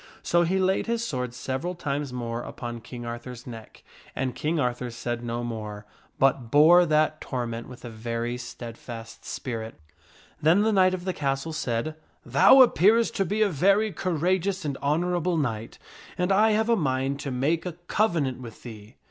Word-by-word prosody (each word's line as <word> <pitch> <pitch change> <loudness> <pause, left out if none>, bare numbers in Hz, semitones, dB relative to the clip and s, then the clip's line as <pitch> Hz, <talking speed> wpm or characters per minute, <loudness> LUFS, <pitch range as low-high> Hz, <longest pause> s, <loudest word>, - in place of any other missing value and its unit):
So 175 - +3
he 175 +3 +1
laid 190 +3 +1
his 235 0 -1
sword 125 - -3
several 135 +8 -4
times 145 -4 -3
more 120 -1 -4
upon 120 -1 -7
King 120 +1 -8
Arthur's 120 +1 -7
neck, 115 -3 -11 0.3
and 130 -1 -1
King 155 +5 -1
Arthur 125 -1 -1
said 120 0 -4
no 120 0 -3
more, 105 -3 -6 0.3
but 130 -3 +2
bore 165 +6 +6
that 155 0 +2
torment 120 -3 -4
with 125 -1 -11
a - - -5
very 115 +2 -3
steadfast 115 -2 -9
spirit. 115 -5 -5 0.6
Then 170 +7 +4
the 220 - +2
knight 185 -1 +4
of 180 -1 -8
the 185 - -1
castle 140 +2 -2
said, 125 0 -2 0.2
" - - -39
Thou 260 - +9
appearest 225 0 +3
to 195 - +2
be 210 +5 +1
a - - +3
very 195 +6 +3
cour 180 -3 -2
ageous 185 +2 0
and 140 -2 -2
honorable 175 +3 0
knight, 115 -7 -3 0.4
and 180 +1 +1
I 215 +3 +4
have 220 +1 +1
a 235 - +5
mind 135 -5 -1
to 140 - -4
make 150 +7 0
a 175 - -4
covenant 155 - 0
with 115 -3 -11
thee." 110 -1 -11
140 Hz, 180 wpm, -26 LUFS, 120-180 Hz, 0.6 s, Thou